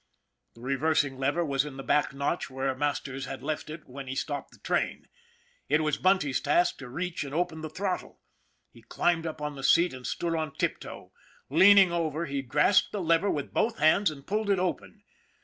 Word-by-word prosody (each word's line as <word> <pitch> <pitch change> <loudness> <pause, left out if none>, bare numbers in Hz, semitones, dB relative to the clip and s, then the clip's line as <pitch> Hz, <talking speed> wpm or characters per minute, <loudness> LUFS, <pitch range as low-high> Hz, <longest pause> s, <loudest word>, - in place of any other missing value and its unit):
The 115 - -15
reversing 135 +1 0
lever 145 +6 +1
was 140 -2 +1
in 145 -3 -8
the 135 - -6
back 150 - +2
notch 140 +5 -2
where 135 0 -2
Masters 135 -1 -3
had 135 - -7
left 155 +1 -3
it 155 +1 -9
when 135 +1 -9
he 130 - -4
stopped 145 +1 -3
the - - -19
train. - - -2 0.6
It 155 - +3
was 150 -2 0
Bunty's 185 -8 +2
task 350 +1 +2
to 135 - -9
reach 170 +6 -3
and 140 0 -7
open 160 -2 -1
the 155 - -5
throttle. 185 +3 -4 0.5
He 115 - -17
climbed 165 +8 0
up 155 -1 -6
on 150 0 -3
the 135 - -8
seat 170 +4 +4
and 130 -1 -7
stood 170 -1 -2
on 155 -3 -3
tiptoe. - - -4 0.4
Leaning 190 +3 +7
over, 165 -1 -1
he 140 -2 -3
grasped 145 +9 +3
the 205 - -3
lever 170 +2 +2
with 145 -2 -3
both 230 +1 +1
hands 160 +6 +4
and 140 -3 -10
pulled 210 +1 -1
it 200 - +3
open. 185 +3 -3
155 Hz, 200 wpm, -28 LUFS, 135-175 Hz, 0.6 s, Leaning